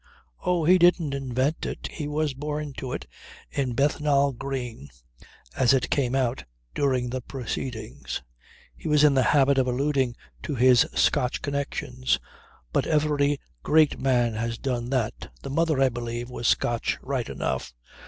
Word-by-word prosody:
"Oh, 175 -3 +1
he 180 +3 +6
didn't 175 -4 +4
invent 135 +2 -1
it. - - -5
He 150 -3 -5
was 150 -1 -1
born 150 +1 -4
to 130 - -5
it, - - -4 0.5
in 135 -3 -1
Bethnal 140 +1 +2
Green, 125 - -5 0.7
as 130 0 +4
it 130 - -1
came 130 -2 +1
out 130 -1 0 0.3
during 130 -4 0
the 130 0 -3
proceedings. 110 - -5 0.5
He - - -8
was 150 -1 +4
in 150 -2 +6
the 135 - +4
habit 140 0 +4
of 130 - +2
alluding 130 -1 +1 0.3
to 150 - -3
his 125 -1 +5
Scotch 125 - +1
connections. 135 -3 -1 0.5
But - - +1
every 145 -2 +2 0.2
great 155 - +3
man 120 -3 +2
has 115 +1 -2
done 120 -2 -2
that. 125 -5 -2
The 135 - -5
mother, 160 -1 +1
I 135 -1 +5
believe, 120 0 -5
was 120 -1 -2
Scotch, 120 -1 +1
right 130 -3 -2
enough. - - -3
135 Hz, 155 wpm, -26 LUFS, 125-145 Hz, 0.7 s, he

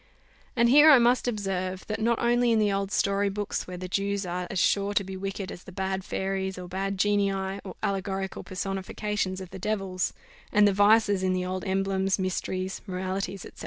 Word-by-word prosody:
And 235 -1 +4
here 295 +4 +8
I 290 - +9
must 245 +1 +3
observe, 190 -4 -2
that 215 0 -4
not 235 +1 +2
only 240 0 +2
in 225 - +4
the 210 -2 +3
old 195 0 -2
story 200 -1 +1
books, 205 +1 -3
where 180 -1 -6
the 185 +1 -5
Jews 200 +1 -1
are 180 0 -3
as 195 - -4
sure 200 +2 +2
to 200 - +3
be 190 0 -7
wicked 195 0 -4
as 175 - -9
the - - -11
bad 190 0 -2
fairies, 190 0 -2
or 180 -1 -7
bad 195 +2 -3
genii, 205 0 +2 0.3
or 190 - -8
allegorical 195 -1 -2
personifications 195 0 -3
of 185 -2 -9
the 190 - -8
devils, 195 -2 -1 0.4
and 210 0 +5
the 200 - +3
vices 205 0 +4
in 185 0 +1
the 180 0 -1
old 185 0 -3
emblems, 195 0 0
mysteries, 185 0 -3
moralities, 190 +1 -3
&c. - - -9
195 Hz, 200 wpm, -27 LUFS, 185-205 Hz, 0.4 s, I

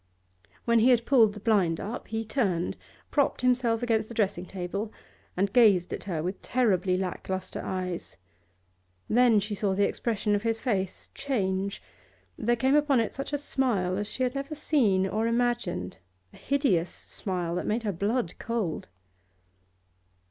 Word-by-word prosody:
When 235 -1 +4
he 235 +3 +5
had 240 -2 +4
pulled 225 -6 +4
the - - -7
blind 195 -7 +2
up, 225 +5 -5
he 225 0 -3
turned, 195 -8 0 0.4
propped 285 -3 +1
himself 245 -2 +2
against 225 -2 +1
the 235 - -8
dressing 190 -4 0
table, 195 +4 -4 0.5
and 195 +1 +1
gazed 205 -8 +5
at - - -6
her 165 -6 -2
with 185 +3 -4
terribly 190 -7 +1
lack 185 0 -4
lustre 190 0 -3
eyes. 180 - -4 0.9
Then 235 -2 +5
she 210 +1 -4
saw 200 -1 0
the 200 +1 +3
expression 215 -2 -1
of 205 - +1
his 225 0 0
face 195 -7 -2
change; 195 -6 -2 0.5
there 240 +2 +1
came 265 +4 +2
upon 290 -4 +4
it 225 +4 -2
a 290 +1 -2
smile 250 -10 0
such - - -1
as 205 0 -1
she 255 - -2
had 250 0 0
never 275 +2 -4
seen 235 -11 +2
or 215 +4 0
imagined, 235 - -1 0.3
a - - -14
hideous 245 - +1
smile 180 -4 -4
that 180 - -2
made 225 +2 0
her 210 - 0
blood 205 +2 -1
cold. 230 -8 -3
215 Hz, 165 wpm, -28 LUFS, 190-240 Hz, 0.9 s, he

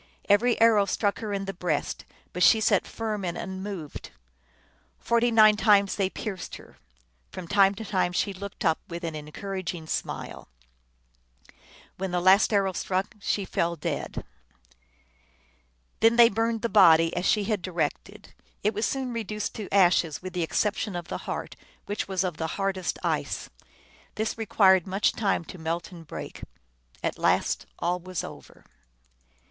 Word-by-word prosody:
Every 230 +4 +3
arrow 225 -3 +5
struck 200 +1 0
her 215 -2 -4
in 195 -1 -2
the 195 - -4
breast, 175 -5 -2 0.3
but 180 - -4
she 220 - +6
sat 220 - +2
firm 215 -3 -4
and 175 -1 -3
unmoved. 190 -3 -6 0.9
Forty 235 +1 +2
nine 215 -2 +6
times 205 -2 +4
they 195 -3 0
pierced 195 -3 -6
her; - - -15 0.5
from 185 -2 -8
time 195 +1 +4
to 220 - -7
time 185 -3 0
she 195 +3 -1
looked 200 +2 -7
up 160 -1 +3
with 170 +1 -7
an 165 -1 -3
encouraging 170 +3 -5
smile. - - -5 1.5
When 190 +1 -3
the 180 0 0
last 190 +5 +5
arrow 195 -2 +2
struck 190 +2 -2
she 200 0 -1
fell 170 -1 -1
dead. 150 - -4 1.7
Then 225 +1 +5
they 235 -1 +8
burned 225 +1 -1
the - - +2
body, 165 -6 +6
as 180 +2 0
she 210 - +3
had 210 -2 -1
directed. 185 +4 -4 0.3
It 210 +2 +2
was 215 +2 0
soon 260 -2 -3
reduced 215 -2 -3
to 210 -3 -7
ashes, 175 -5 +3
with 185 0 -8
the 180 - -2
exception 205 +4 -1
of 175 -1 -6
the - - -4
heart, - - -4 0.3
which 205 - -3
was 190 -1 0
of 180 -4 -3
the 160 - -2
hardest 195 -2 -1
ice. - - -2 0.6
This 220 0 -2
re 225 -1 -5
quired 190 -4 +5
much 195 +2 +1
time 195 -5 -1
to 180 - -10
melt 165 +2 -3
and 165 -3 -12
break. - - -8 0.6
At - - -2
last - - +1
all 175 +1 -1
was 180 -1 -5
over. - - -11
195 Hz, 160 wpm, -26 LUFS, 175-210 Hz, 1.7 s, they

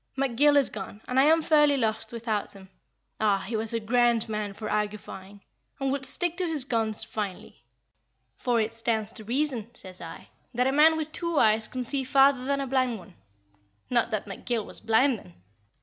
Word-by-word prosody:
"McGill 275 +2 +3
is 275 - +2
gone, 200 0 -7
and 255 +1 +1
I 270 - +6
am 320 +1 +4
fairly 295 -3 +4
lost 220 -2 -1
without 225 -3 -3
him. 190 -1 -14 0.5
Ah! 210 -2 +3
he 230 - -3
was 220 0 -1
a 230 - -1
grand 235 +1 +2
man 210 -2 -4
for 215 - -6
argufying, 205 -2 -4 0.4
and 270 -1 0
would 275 -1 +1
stick 350 -1 0
to 365 -2 0
his 305 -5 0
guns 225 -4 -1
finely. 200 - -6 0.7
'For 240 - 0
it 220 +1 -1
stands 225 -1 -2
to 220 - -9
reason,' 245 -1 -1
says 185 -5 -7
I, 165 -1 -10 0.3
'that 250 +1 +2
a 265 - +2
man 310 +3 +5
with 315 -1 -4
two 335 0 -3
eyes 220 -2 +4
can 255 -1 -4
see 270 +2 +2
farther 270 0 +4
than 280 0 0
a - - -2
blind 255 -3 0
one' 185 -1 -14 0.8
not 235 -1 +2
that 215 -3 -2
McGill 215 +2 -3
was - - -10
blind 225 +2 +3
then? 90 - -16
235 Hz, 195 wpm, -27 LUFS, 215-275 Hz, 0.8 s, I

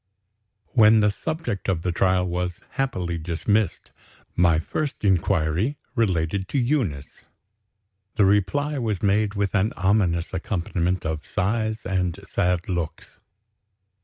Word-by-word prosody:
When 110 -2 +6
the 105 0 +3
subject 125 - -4
of 85 -4 0
the 90 - 0
trial 90 +1 +2
was 90 0 -3
happily 95 - -2
dismissed, 95 +6 -1 0.4
my 85 -2 +4
first 140 - -3
inquiry 95 - +1 0.2
related 95 - 0
to 140 - -2
Eunice. 120 - -1 0.9
The 105 - +4
reply 135 +10 +1
was 110 -6 -2
made 105 +1 +2
with 100 -2 -1
an 100 +2 +1
ominous 95 -3 +1
accompaniment 90 -1 -1
of 80 -1 -3
sighs 110 +3 -1
and 90 -2 -1
sad 90 -3 0
looks. 85 -4 -4
95 Hz, 120 wpm, -24 LUFS, 85-110 Hz, 0.9 s, When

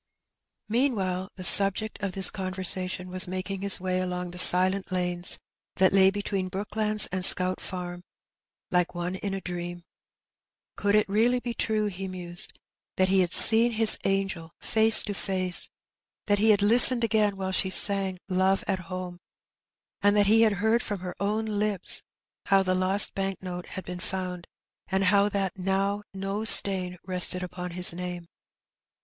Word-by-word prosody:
'* - - -63 0.3
Meanwhile 205 -6 -2
the 185 - -10
subject 200 +4 +4
of 195 -2 -5
this 190 0 +5
conversation 185 -1 -2
was 185 0 +1
making 185 +1 -6
his 200 -1 +3
way 185 0 -3
along 180 -1 -5
the 180 - -8
silent 185 +2 +4
lanes 180 -1 -1 0.4
that 190 0 +1
lay 190 -1 +4
between 200 -1 -4
Brooklands 210 +2 -1
and 185 0 -3
Scout 185 0 +1
Farm 180 -1 -8 0.7
like 180 0 -1
one 175 +1 -5
in 195 0 -5
a 195 - -7
dream. 175 -1 -8 0.9
Could 205 0 -1
it 215 - +2
be 195 - -10
really 240 +2 0
true, 215 -2 -2
he 195 -1 -6
mused^ 175 -2 -2 0.5
that 185 0 +1
he 195 0 +2
had 180 -2 0
seen 230 +2 +7
his 220 -1 +6
angel 195 -4 -3
face 220 0 +5
to 205 - -6
face^ 185 -2 -3 0.6
that 205 -1 0
he 220 +2 +2
had 205 -1 +3
listened 235 +3 +4
again 215 -3 0
while 190 -1 -5
she 190 0 -1
sang 195 -1 +2
"Love 190 +1 -1
at 195 -2 -2
Home/' 185 -1 -8 0.8
and 205 +1 +2
that 205 -1 +3
he 220 +3 +3
heard 220 +2 0
from 205 -6 -6
her 180 -1 -7
own 210 +2 -3
lips 210 -2 -3 0.5
how 195 -1 +2
the 185 -1 -2
lost 185 +2 +1
bank 195 -1 -5
note 180 -1 -8
had 190 -2 -9
been 180 0 -8
found, 180 -2 -6 0.4
and 190 0 -2
how 200 +2 +2
that 195 -2 -4
now 195 +2 -2
no 195 +2 -5
stain 185 -4 +4
rested 180 0 +1
upon 180 0 -8
his 180 0 +4
name 180 0 -7
190 Hz, 165 wpm, -25 LUFS, 180-205 Hz, 0.9 s, seen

